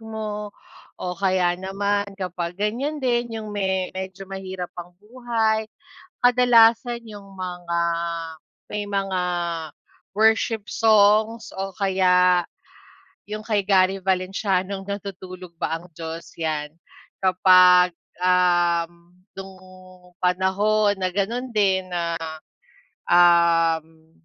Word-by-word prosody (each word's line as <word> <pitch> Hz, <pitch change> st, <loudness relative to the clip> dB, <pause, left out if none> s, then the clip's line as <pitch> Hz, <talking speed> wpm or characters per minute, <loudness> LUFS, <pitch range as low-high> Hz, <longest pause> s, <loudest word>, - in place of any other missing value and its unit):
mo. 215 Hz, -1 st, -5 dB, 0.5 s
O 180 Hz, -, -4 dB
kaya 185 Hz, -1 st, +1 dB
naman 200 Hz, +2 st, -2 dB
kapag 180 Hz, -2 st, -5 dB
ganyan 240 Hz, +9 st, -2 dB
din, 240 Hz, -2 st, 0 dB
'yung 215 Hz, -1 st, -7 dB
me 190 Hz, -2 st, -1 dB
medyo 190 Hz, +1 st, -7 dB
mahirap 190 Hz, -2 st, -7 dB
ang 175 Hz, 0 st, -14 dB
buhay, 220 Hz, 0 st, -1 dB, 0.5 s
kadalasan 240 Hz, -1 st, +4 dB
'yung 205 Hz, -2 st, -10 dB
mga 180 Hz, -2 st, -4 dB, 0.9 s
may 210 Hz, 0 st, -4 dB
mga 195 Hz, -2 st, -2 dB, 0.9 s
worship 220 Hz, 0 st, +2 dB
songs 220 Hz, +1 st, +3 dB
o 195 Hz, 0 st, -4 dB
kaya 180 Hz, -2 st, +3 dB, 0.8 s
'yung 215 Hz, +1 st, -6 dB
kay 210 Hz, -3 st, -1 dB
Gary 190 Hz, -1 st, +3 dB
Valenciano'ng 190 Hz, +1 st, -1 dB
Natutulog 185 Hz, -3 st, -8 dB
ba 165 Hz, -, -1 dB
ang 175 Hz, +2 st, -8 dB
Diyos? 165 Hz, +1 st, -9 dB
'Yan. 155 Hz, -2 st, -2 dB, 0.5 s
Kapag, 185 Hz, -1 st, +5 dB, 0.3 s
um, 175 Hz, -1 st, +1 dB, 0.2 s
nung 195 Hz, 0 st, -9 dB, 0.7 s
panahon 200 Hz, +3 st, +2 dB
na 185 Hz, -2 st, -2 dB
ganun 230 Hz, +7 st, -2 dB
din 190 Hz, -4 st, +1 dB
na, 170 Hz, -1 st, -2 dB, 0.9 s
um, 165 Hz, -2 st, +3 dB
190 Hz, 100 wpm, -23 LUFS, 180-210 Hz, 0.9 s, Kapag